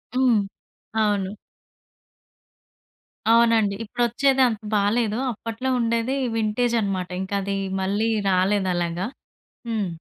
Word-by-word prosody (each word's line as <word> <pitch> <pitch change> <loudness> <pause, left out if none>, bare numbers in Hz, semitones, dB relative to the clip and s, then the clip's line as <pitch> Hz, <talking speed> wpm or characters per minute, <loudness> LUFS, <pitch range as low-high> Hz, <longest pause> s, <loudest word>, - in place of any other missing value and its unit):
హ్మ్. 255 -4 +4 0.6
అవును. 205 -1 -1 1.9
అవునండి. 230 -3 +4
ఇపుడొచ్చేదంత 240 +1 +2 0.2
బాలేదు. 215 +2 +1
అప్పట్లో 230 +3 -4
ఉండేది 230 +2 0 0.2
వింటేజ్ 225 +2 +1
అన్నమాట. 185 -3 -2
ఇంకది 195 0 -2 0.2
మళ్ళీ 205 +4 0 0.2
రాలేదలాగా. 185 -2 +1 0.6
హ్మ్. 215 -4 -1
215 Hz, 80 wpm, -23 LUFS, 195-235 Hz, 1.9 s, హ్మ్